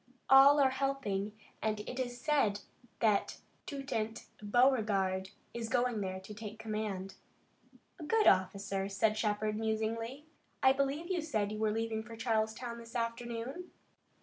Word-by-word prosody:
All 275 +2 +9
are 270 -2 +5
helping 260 -7 -1 0.3
and 215 -1 0
it 250 +4 -6
is 245 -1 -3
said 250 -10 +2 0.4
that 210 -3 +2 0.3
Toutant 235 -6 -3 0.2
Beauregard 205 -5 +2 0.2
is 230 -1 -4
going 245 -3 +1
there 190 -1 -3
to 200 +3 -9
take 215 0 -8
command." 210 -3 -4 0.9
"A - - -7
good 440 +8 +2
officer," 195 +1 +2
said 210 +2 +2
Shepard, 215 0 0
musingly. 225 +5 -2 0.4
"I 265 0 +7
believe 280 +6 -1
you 355 -2 +1
said 215 -10 -1
you 215 - -4
were 220 0 +2
leaving 225 0 -1
for 230 +1 -10
Charleston 225 +1 -1
this 230 +1 -12
afternoon?" 235 +7 -3
225 Hz, 140 wpm, -33 LUFS, 210-260 Hz, 0.9 s, All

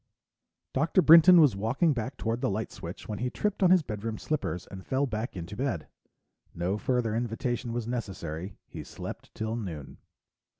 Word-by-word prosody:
Dr. 165 +6 +3
Brinton 170 +2 +9
was 145 -10 +5
walking 125 - +1
back 125 +1 -4
toward 115 +2 -2
the 135 - +1
light 105 +2 -3
switch 85 +2 -8
when 105 -2 -4
he 125 +1 -1
tripped 205 +10 -2
on 185 - +6
his 180 -2 +5
bedroom 110 -2 -4
slippers 140 - -3
and 95 -1 -10
fell 135 +6 0
back 110 -4 -4
into 85 +3 -6
bed. 120 - -2 0.7
No 90 +5 -1
further 125 -4 0
invitation 120 +1 -2
was 120 -1 -2
necessary; 95 -7 -5
he - - -8
slept - - -8
till 110 +1 -2
noon. 85 - -6
115 Hz, 170 wpm, -28 LUFS, 100-135 Hz, 0.7 s, Brinton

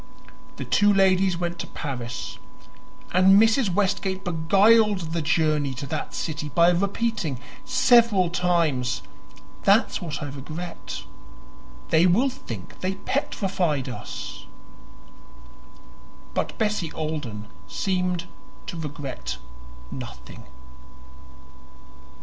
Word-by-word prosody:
The - - -5
two 205 0 +4
ladies 190 -2 +3
went 175 0 -3
to - - -4
Paris, 125 -5 -5 0.7
and 190 +2 +6
Mrs. 225 -1 +4
Westgate 195 0 0
beguiled 195 +1 +3
the 170 - 0
journey 150 -3 +1
to 135 - -5
that - - -4
city 155 -1 -3
by 170 +3 +5
repeating 195 - -1 0.3
several 235 -8 +4
times 160 - +1 0.6
"That's - - +3
what 150 -3 -4
I 145 - -4
regret; 155 +6 -7 0.9
they 165 +2 +5
will 230 +10 +4
think 115 - -9
they 185 +1 -1
petrified 185 - -1
us." 125 - -7 1.9
But - - -2
Bessie 210 -7 0
Alden 145 -10 -4 0.2
seemed 180 - -1 0.4
to 170 - -6
regret 145 -4 -5 0.5
nothing. - - -9
175 Hz, 95 wpm, -25 LUFS, 150-195 Hz, 1.9 s, and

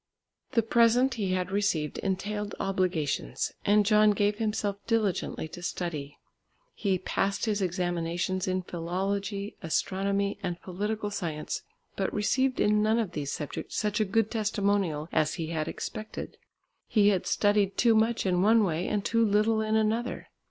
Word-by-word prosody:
The 230 -3 +3
present 235 +3 +4
he 200 -6 -1
had 185 0 -1
received 190 -7 0
entailed 205 +2 -2
obligations, 175 - -1
and 205 0 +4
John 210 0 +5
gave 205 +1 +1
himself 210 -2 -1
diligently 210 -8 0
to 175 - -9
study. 160 -5 -4 0.6
He 195 -3 0
passed 195 +3 -1
his 210 -2 0
examinations 175 0 -1
in 185 0 0
Philology, 195 +4 -3
Astronomy, 195 +4 0
and 175 -2 -3
Political 205 +3 -3
Science, 160 -6 -3 0.3
but 195 - -1
received 260 +5 +1
in 210 0 +3
none 215 +2 +3
of 220 -6 -1
these 145 -4 -3
subjects 150 - -5
such 210 0 0
a - - +4
good 215 +2 +1
testimonial 200 -8 0
as 155 0 +1
he 165 -3 -4
had 155 -1 -2
expected. 215 +5 -6 0.5
He 205 -2 +4
had 190 -3 0
studied 205 -1 +2
too 235 -2 +5
much 225 +1 +2
in 180 -1 +2
one 220 +3 +5
way 175 -2 -1
and 205 -2 -1
too 230 0 +2
little 215 +1 +3
in 215 0 0
another. 220 +3 0
200 Hz, 150 wpm, -28 LUFS, 180-215 Hz, 0.6 s, John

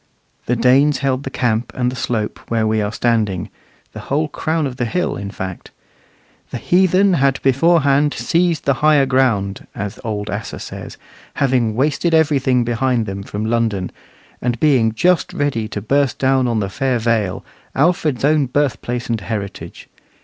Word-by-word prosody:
The 125 - +2
Danes 130 +5 +4
held 130 -1 +1
the - - -3
camp 120 -3 -1
and 125 -1 0
the - - -7
slope 115 -4 -2
where 115 -1 +1
we 110 0 +1
are 105 0 -2
standing 105 -6 0 0.4
the - - -7
whole 150 +3 -1
crown 160 0 -1
of 130 -2 -5
the 120 - -1
hill, 180 +10 -1
in 100 0 -5
fact. 95 -3 -7 0.8
"The - - -5
heathen 185 +2 +3
had 135 -4 +2
beforehand 145 0 +3
seized 170 -2 0
the 140 - +3
higher 150 -2 +5
ground," 115 -7 0
as 100 +1 -5
old 105 -3 -3
Asser - - -5
says, - - -8 0.4
having 125 -5 +1
wasted 150 +6 +1
everything 135 -5 +2
behind 120 0 0
them 100 -1 -5
from 105 +2 -5
London, 110 -5 -1 0.5
and 120 -1 -1
being 130 -7 +3
just 175 +9 +1
ready 135 -7 -1
to 105 -2 -6
burst 140 +3 +1
down 130 -1 +2
on 115 -2 0
the 100 - -2
fair 130 +4 0
Vale, 115 -5 -1 0.3
Alfred's 150 -3 +1
own 150 -2 +3
birthplace 125 -2 -1
and 115 -2 -2
heritage. 100 -2 -6
125 Hz, 165 wpm, -18 LUFS, 110-145 Hz, 0.8 s, higher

